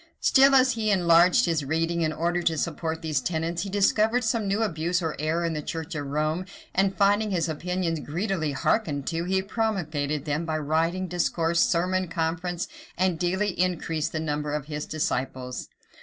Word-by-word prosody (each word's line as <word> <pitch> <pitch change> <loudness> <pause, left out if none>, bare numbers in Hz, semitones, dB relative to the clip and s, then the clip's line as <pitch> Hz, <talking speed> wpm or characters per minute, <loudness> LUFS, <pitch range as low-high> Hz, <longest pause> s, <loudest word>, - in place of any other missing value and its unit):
[] - - -47
Still, 270 0 +5
as 260 -1 +5
he 225 -2 -1
enlarged 180 +3 +5
his 160 -3 0
reading, 165 +4 0
in 155 -1 +1
order 170 +3 -1
to 165 -2 +1
support 160 +1 -3
these 155 -4 0
tenets, 165 +1 -2
he 200 - -4
discovered 215 +4 +2
some 220 -1 0
new 200 +3 +1
abuse 175 -2 0
or 160 -4 -2
error 160 +3 0
in 165 - -1
the 155 - -3
church 160 +3 -5
of 145 -2 -4
Rome; 155 +5 -1 0.3
and 195 +1 +1
finding 205 +1 +3
his 170 -4 0
opinions 170 +1 -2
greedily 165 -1 -2
hearkened 145 0 0
to, 165 0 -2
he 190 +1 +1
promulgated 160 -10 -2
them 150 +2 -1
by 160 -2 -2
writing, 165 +5 0
discourse, 170 -1 0
sermon, 185 +2 +1
conference; 170 +2 -2 0.3
and 180 -2 +1
daily 190 +4 0
increased 165 -4 0
the 155 - -2
number 150 -1 -2
of 150 -2 -3
his 150 -1 -5
disciples. 130 -4 -3
170 Hz, 180 wpm, -26 LUFS, 155-185 Hz, 0.3 s, Still